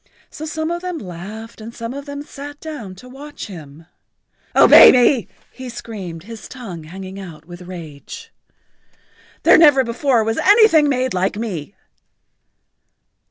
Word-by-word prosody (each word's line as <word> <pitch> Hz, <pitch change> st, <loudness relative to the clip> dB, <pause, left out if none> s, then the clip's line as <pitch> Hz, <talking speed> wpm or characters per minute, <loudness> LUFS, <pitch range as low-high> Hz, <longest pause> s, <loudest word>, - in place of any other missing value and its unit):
So 310 Hz, -, -7 dB
some 315 Hz, +1 st, -3 dB
of 345 Hz, 0 st, -3 dB
them 360 Hz, -2 st, -4 dB
laughed 210 Hz, -, -9 dB
and 230 Hz, +2 st, -10 dB
some 230 Hz, +1 st, -6 dB
of 280 Hz, +1 st, -8 dB
them 285 Hz, 0 st, -6 dB
sat 290 Hz, 0 st, -10 dB
down 280 Hz, -13 st, -8 dB
to 250 Hz, +7 st, -14 dB
watch 285 Hz, +3 st, -9 dB
him. 160 Hz, -4 st, -12 dB, 0.7 s
"Obey -, -, +9 dB
me!" 245 Hz, -1 st, +3 dB, 0.2 s
he 260 Hz, -1 st, -9 dB
screamed, 195 Hz, -8 st, -8 dB
his 220 Hz, -1 st, -10 dB
tongue 190 Hz, -, -9 dB
hanging 190 Hz, +3 st, -9 dB
out 160 Hz, -5 st, -11 dB
with 175 Hz, +1 st, -11 dB
rage. 170 Hz, -6 st, -10 dB, 1.1 s
"There -, -, +6 dB
never 290 Hz, -5 st, +6 dB
before 240 Hz, 0 st, +1 dB
was 225 Hz, +1 st, -1 dB
anything 405 Hz, -8 st, +5 dB
made 255 Hz, -1 st, 0 dB
like 185 Hz, +2 st, -1 dB
me." 200 Hz, -6 st, -5 dB
230 Hz, 145 wpm, -19 LUFS, 185-285 Hz, 1.1 s, Obey